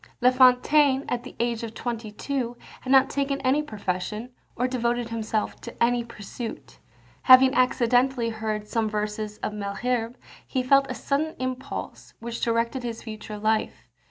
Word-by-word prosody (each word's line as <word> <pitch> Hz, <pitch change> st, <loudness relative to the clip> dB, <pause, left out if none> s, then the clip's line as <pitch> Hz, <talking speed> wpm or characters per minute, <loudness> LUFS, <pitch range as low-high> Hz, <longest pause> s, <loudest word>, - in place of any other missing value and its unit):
La 250 Hz, +1 st, +5 dB
Fontaine, 265 Hz, +2 st, +4 dB
at 245 Hz, -, -1 dB
the 255 Hz, -, -11 dB
age 235 Hz, -1 st, 0 dB
of 225 Hz, -1 st, -6 dB
twenty 230 Hz, -3 st, -4 dB
two, 245 Hz, +1 st, -3 dB, 0.2 s
had 260 Hz, -, -5 dB
not 270 Hz, 0 st, +6 dB
taken 280 Hz, 0 st, -1 dB
any 265 Hz, +3 st, +2 dB
profession, 210 Hz, -1 st, -4 dB, 0.2 s
or 250 Hz, +1 st, 0 dB
devoted 240 Hz, -1 st, -1 dB
himself 220 Hz, -1 st, -2 dB
to 235 Hz, -, -9 dB
any 240 Hz, 0 st, +2 dB
pursuit. 230 Hz, 0 st, -8 dB, 0.4 s
Having 260 Hz, 0 st, +8 dB
accidentally 250 Hz, 0 st, +2 dB
heard 215 Hz, -1 st, -3 dB
some 220 Hz, 0 st, 0 dB
verses 210 Hz, 0 st, -3 dB
of -, -, -2 dB
Malherbe, 225 Hz, +4 st, -2 dB, 0.3 s
he 255 Hz, -, -1 dB
felt 275 Hz, +2 st, +4 dB
a 255 Hz, -, -3 dB
sudden 295 Hz, +7 st, -1 dB
impulse, 255 Hz, 0 st, -5 dB
which 235 Hz, 0 st, -6 dB
directed 230 Hz, +2 st, 0 dB
his 235 Hz, -2 st, -5 dB
future 215 Hz, -1 st, -7 dB
life. 215 Hz, +1 st, -1 dB
240 Hz, 155 wpm, -25 LUFS, 220-255 Hz, 0.4 s, Having